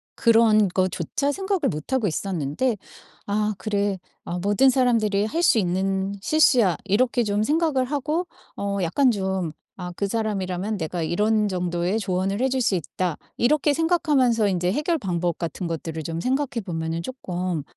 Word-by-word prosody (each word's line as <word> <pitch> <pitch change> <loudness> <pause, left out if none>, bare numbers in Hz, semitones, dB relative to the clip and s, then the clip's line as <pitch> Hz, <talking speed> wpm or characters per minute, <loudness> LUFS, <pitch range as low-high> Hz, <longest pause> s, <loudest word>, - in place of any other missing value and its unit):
그런 225 -3 +5
거조차 185 - -1
생각을 385 +1 -1
못 155 - -6
하고 250 -6 +2
있었는데 185 - -1 0.5
아 210 +1 0
그래. 200 -1 -1 0.3
아 175 +1 -3
모든 205 +8 +4
사람들이 230 -6 +2
할 330 +10 -1
수 290 - +5
있는 190 +1 0
실수야.' 245 - +4
이렇게 240 +4 +2
좀 205 0 0
생각을 300 0 +1
하고 300 +5 -1 0.3
어 200 0 -2
약간 250 - +3
좀 190 -5 -2 0.2
'아 180 -1 -6
그 200 - 0
사람이라면 200 -2 -2
내가 170 +1 -3
이런 210 +5 +1
정도의 180 +2 -1
조언을 195 0 -1
해 265 - +3
줄 260 0 0
수 230 -5 +2
있다.' 175 0 -2 0.2
이렇게 290 +4 +3
생각하면서 290 - +2
인제 180 -2 0
해결 305 - 0
방법 175 - -2
같은 170 +1 -4
것들을 160 -1 -4
좀 165 +1 -4
생각해 265 0 -1
보면은 165 -1 -3
쪼끔 180 - -4
205 Hz, 320 characters per minute, -24 LUFS, 180-255 Hz, 0.5 s, 그런